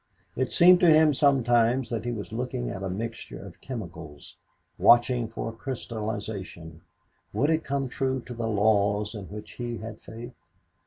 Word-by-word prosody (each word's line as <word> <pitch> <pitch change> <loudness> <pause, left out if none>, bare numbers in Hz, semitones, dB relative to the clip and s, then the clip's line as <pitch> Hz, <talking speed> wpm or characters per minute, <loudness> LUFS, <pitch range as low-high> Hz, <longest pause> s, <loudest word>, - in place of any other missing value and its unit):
It 130 - -1
seemed 180 +1 +7
to 175 - +5
him 155 -1 +6
sometimes 125 -3 +3
that 115 -1 -3
he 120 - -1
was 105 -2 -6
looking 110 - -3
at 95 - -6
a 95 - -3
mixture 115 +4 -5
of - - -12
chemicals 85 - -8 0.4
watching 120 0 +5
for 115 0 -5
a 115 - -9
crystallization 105 -8 -6 0.5
would 145 +4 +2
it 160 0 +1
come 140 -1 -2
true 130 +1 -1
to 125 - -9
the 115 -1 -3
laws 105 0 +2
in 105 -3 -7
which 105 +2 -9
he 120 -1 -5
had 110 0 -8
faith? 120 +2 -9
115 Hz, 165 wpm, -27 LUFS, 105-130 Hz, 0.5 s, seemed